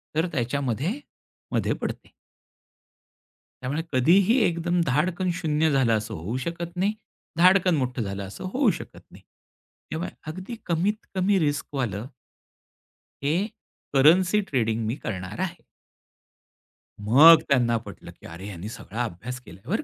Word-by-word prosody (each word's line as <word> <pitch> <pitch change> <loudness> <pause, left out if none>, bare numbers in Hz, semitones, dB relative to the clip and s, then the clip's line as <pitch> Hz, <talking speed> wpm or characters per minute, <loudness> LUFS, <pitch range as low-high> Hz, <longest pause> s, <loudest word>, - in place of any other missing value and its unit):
तर 160 +3 +2
त्याच्यामध्ये, 140 - -1 0.5
मध्ये - - +1
पडते. - - -5 1.5
त्यामुळे 140 +5 -2
कधीही 180 - +4
एकदम 175 +1 0
धाडकन 170 +7 0
0 160 -3 +1
झालं 130 -5 +3
असं 110 +1 -5
होऊ 100 +7 -4
शकत 170 +5 -5
नाही, 195 +4 +1 0.4
धाडकन 185 0 +5
मोठं 125 -3 -1
झालं 100 -1 -4
असं 95 - -9
होऊ 265 -2 +3
शकत - - -9
नाही. - - -15 0.7
त्यामुळे 165 +3 -3 0.2
अगदी 185 +9 -6
कमीत 190 +6 0
कमी 190 +1 +2
रिस्क 145 -3 0
वालं 115 -4 -2 1.2
हे 145 +3 +2 0.6
करन्सी 180 +9 +5
ट्रेडिंग 115 -4 0
मी 115 - -1
करणार 95 - -5
आहे. 180 -2 -2 1.4
मग 145 +11 +8
त्यांना 120 -4 +3
पटलं, 115 - -10
की - - -19
अरे, 85 +4 -9
ह्यांनी 100 0 -7
सगळा 115 +1 -5
अभ्यास 120 +4 -6
केलाय 95 +7 -14
बरं. 220 - 0
145 Hz, 130 wpm, -25 LUFS, 115-175 Hz, 1.5 s, मग